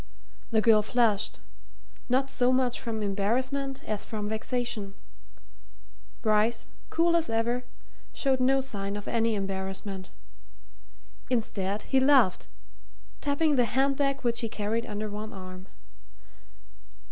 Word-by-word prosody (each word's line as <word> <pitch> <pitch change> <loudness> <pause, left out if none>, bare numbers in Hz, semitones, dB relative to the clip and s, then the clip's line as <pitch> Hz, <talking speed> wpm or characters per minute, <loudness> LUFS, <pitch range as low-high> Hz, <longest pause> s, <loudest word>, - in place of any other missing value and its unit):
The 220 -2 +3
girl 215 -1 +6
flushed, 215 -2 +1 0.7
not 265 +2 +2
so 250 0 +3
much 255 -1 +2
from 220 -2 -3
embarrassment 255 +7 -1
as 210 -1 -3
from 210 -2 -4
vexation; 220 -2 -2 1.3
Bryce, 220 +1 +2 0.2
cool 335 +1 +3
as 330 -1 +2
ever, 235 +2 0 0.5
showed 265 -2 +1
no 270 +1 +3
sign 200 -6 -3
of 205 - -6
any 230 -1 +1
embarrassment. 195 -1 -4 1.2
Instead, 210 -4 -1
he 265 - +2
laughed, 265 -8 +4 0.7
tapping 290 0 +2
the 245 - +5
hand 270 +4 +2
bag 275 -1 0
which 235 -1 0
he 230 - -2
carried 215 +2 -2
under 210 -1 -3
one 210 +1 -6
arm. 185 0 -9
230 Hz, 120 wpm, -28 LUFS, 205-260 Hz, 1.3 s, girl